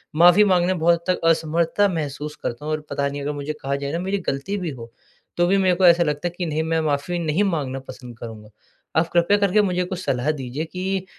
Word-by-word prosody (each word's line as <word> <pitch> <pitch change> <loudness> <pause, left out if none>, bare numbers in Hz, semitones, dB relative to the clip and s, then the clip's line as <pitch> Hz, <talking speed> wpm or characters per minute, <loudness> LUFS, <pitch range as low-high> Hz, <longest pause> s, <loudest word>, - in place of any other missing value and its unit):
माफ़ी 175 +5 +7
माँगने 180 -3 +3
में 175 - -4
बहुत 170 +1 +3
हद 180 - +4
तक - - -6
असमर्थता 165 +4 +2
महसूस 150 -1 -4
करता 135 +6 -4
हूँ 155 - -2
और 155 - -2
पता 140 0 -1
नहीं, 140 0 -5
अगर 145 +1 -2
मुझे 145 +1 -4
कहा 140 +1 -1
जाए 140 0 -4
ना, 165 - -2
मेरी 190 +2 -1
गलती 140 +10 -2
भी 180 -3 -3
हो, 115 -3 -10 0.5
तो 175 - +3
भी 195 +2 +3
मेरे 185 -2 +3
को 185 +1 +3
ऐसा 170 0 +6
लगता 150 +2 -1
है 175 - -5
कि 175 - -2
नहीं, 155 0 -1
मैं 160 0 0
माफ़ी 155 +3 -1
नहीं 165 +4 +1
माँगना 145 -8 -1
पसंद 125 -3 -10
करूँगा। 110 -2 -9 0.5
आप 165 +1 +2
कृपया 175 +4 +4
करके 205 +1 +3
मुझे 180 -3 0
कुछ 180 0 -5
सलाह 135 +4 0
दीजिए 140 +2 -4
कि 190 +2 -3
165 Hz, 240 wpm, -22 LUFS, 145-180 Hz, 0.5 s, माफ़ी